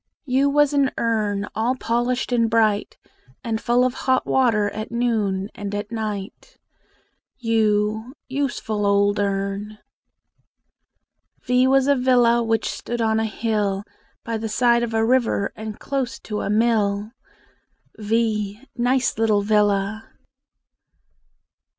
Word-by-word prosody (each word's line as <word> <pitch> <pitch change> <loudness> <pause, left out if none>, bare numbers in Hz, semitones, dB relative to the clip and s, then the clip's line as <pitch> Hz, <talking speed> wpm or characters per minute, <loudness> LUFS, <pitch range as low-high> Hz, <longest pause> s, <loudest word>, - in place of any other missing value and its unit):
U 270 +1 +2
was 295 0 +3
an 280 -2 +3
urn 210 -3 0
All 230 +4 0
polished 245 +1 -1
and 230 -2 +2
bright, 220 -2 +1 0.5
And 225 -2 -2
full 245 +1 +2
of 255 - 0
hot 260 0 0
water 225 -6 +2
At 215 0 -6
noon 215 -5 -1
and 205 0 -5
at 205 +1 -5
night. 210 -3 -5 0.8
u 220 +1 0
Useful 245 -6 -2
old 200 0 +2
urn! 200 +1 -2 1.7
V 250 +1 +3
was 270 0 +4
a 285 0 +4
villa 245 -2 +3
Which 225 -1 0
stood 240 0 -4
on 220 -1 +1
a 225 - 0
hill, 210 -2 -1 0.4
By 230 -1 -3
the 225 0 -4
side 235 +2 +3
of 230 -1 -2
a 225 0 +2
river, 235 -4 +1
And 215 -1 -7
close 270 -3 -3
to 210 -1 -4
a - - -3
mill. 210 -1 +1 0.9
v 215 -1 -1 0.2
Nice 245 -2 +1
little 215 -2 +2
villa! 205 0 +1
225 Hz, 125 wpm, -22 LUFS, 210-245 Hz, 1.7 s, was